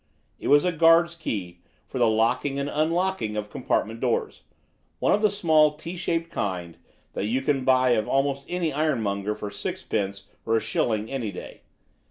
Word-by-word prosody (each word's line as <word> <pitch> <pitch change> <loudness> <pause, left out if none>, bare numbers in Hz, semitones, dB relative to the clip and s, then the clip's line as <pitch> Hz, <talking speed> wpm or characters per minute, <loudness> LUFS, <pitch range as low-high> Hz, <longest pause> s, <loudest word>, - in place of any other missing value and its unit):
It - - -5
was 145 +3 +5
a 180 - +2
guard's 165 +1 +5
key 95 - -5 0.3
for 130 - -6
the 120 - +4
locking 115 +5 +1
and 140 0 -1
unlocking 155 - 0
of 105 0 -4
compartment 115 +1 -1
doors, 120 -2 -1 0.6
one - - +2
of 205 - +2
the 215 - +4
small 155 -6 +3
T 170 +4 -7
shaped 165 -1 -2
kind 90 -4 -4 0.3
that - - -2
you 130 +4 0
can 135 -1 +1
buy 130 -1 +4
of 110 -3 +1
almost 140 0 0
any 175 -4 -1
iron 150 -4 +1
monger 100 +1 -2
for 105 -1 -6
sixpence 100 -1 -3 0.2
or 115 0 +2
a - - +2
shilling 110 0 -1
any 120 -6 -3
day. 90 - -10
135 Hz, 180 wpm, -25 LUFS, 105-160 Hz, 0.6 s, was